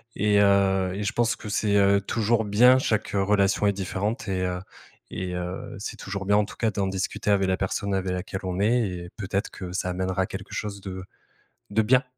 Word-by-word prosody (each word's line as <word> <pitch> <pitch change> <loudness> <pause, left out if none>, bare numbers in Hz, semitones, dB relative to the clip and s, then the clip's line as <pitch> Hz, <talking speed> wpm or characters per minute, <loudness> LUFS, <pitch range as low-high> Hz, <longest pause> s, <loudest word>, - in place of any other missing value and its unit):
et 105 -1 +3
heu, 95 -2 +3
et 105 - -3
je 100 - -1
pense 120 -1 +1
que 105 - -9
c'est, 105 0 +1
heu, 100 0 +4
toujours 110 +2 +1
bien. 125 +5 +6
Chaque 110 -4 0
relation 100 0 +2
est 100 - +3
différente 100 +6 -3
et 95 -1 -1
heu, 90 0 -2 0.5
et 90 -1 -4
heu, 90 +1 -5
c'est 100 - -6
toujours 100 0 -5
bien 105 +1 +4
en 105 - +3
tout - - -12
cas 110 -2 +1
d'en 100 0 -1
discuter 95 +2 -1
avec 95 -1 +3
la 95 0 +1
personne 100 +1 -2
avec 95 -1 -1
laquelle 95 +1 -4
on 90 0 -3
est, 115 +4 +3
et 90 -1 -6
peut-être 100 -1 -2
que 90 -1 -7
ça 90 0 -2
amènera 95 +1 -1
à - - -1
quelque 95 +1 -8
chose 100 -2 -4
de 95 -1 -6 0.7
de 110 +2 +3
bien. 125 +4 +4
100 Hz, 215 wpm, -25 LUFS, 95-105 Hz, 0.7 s, bien